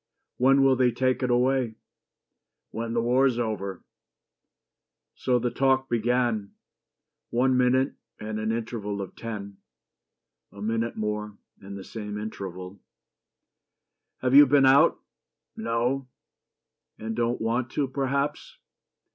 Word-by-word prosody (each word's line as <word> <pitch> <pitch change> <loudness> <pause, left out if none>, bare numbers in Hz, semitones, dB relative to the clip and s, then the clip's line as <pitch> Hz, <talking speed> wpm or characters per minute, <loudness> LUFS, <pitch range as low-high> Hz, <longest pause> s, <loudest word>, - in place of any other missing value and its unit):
"When 135 +2 +4
will 135 -1 +5
they 125 -1 +3
take 130 +3 0
it 125 - 0
away?" 125 -1 +1 1.0
"When 115 +1 -4
the 115 -1 +1
war's 125 +1 +3
over." 105 -5 -3 1.3
So 125 -1 +1
the 120 0 -1
talk 135 +1 +2
began 120 -3 0 0.7
One 130 +2 +2
minute 130 +2 +2 0.3
and 110 0 -4
an 110 +1 -1
interval 110 -3 -3
of 95 -2 -6
ten, 100 -3 -7 0.9
A 100 - -13
minute 115 +2 -2
more 105 -1 -3 0.2
and 100 0 -9
the 95 - -8
same 105 -1 -6
interval. 95 -3 -7 1.4
"Have 130 0 +1
you 145 +1 +9
been 140 0 +5
out?" 135 +2 +5 0.6
"No." 120 +4 -1 0.9
"And 110 +1 -5
don't 120 +1 0
want 120 +2 -1
to, 140 - 0
perhaps?" 140 +2 -2
120 Hz, 120 wpm, -26 LUFS, 110-130 Hz, 1.4 s, you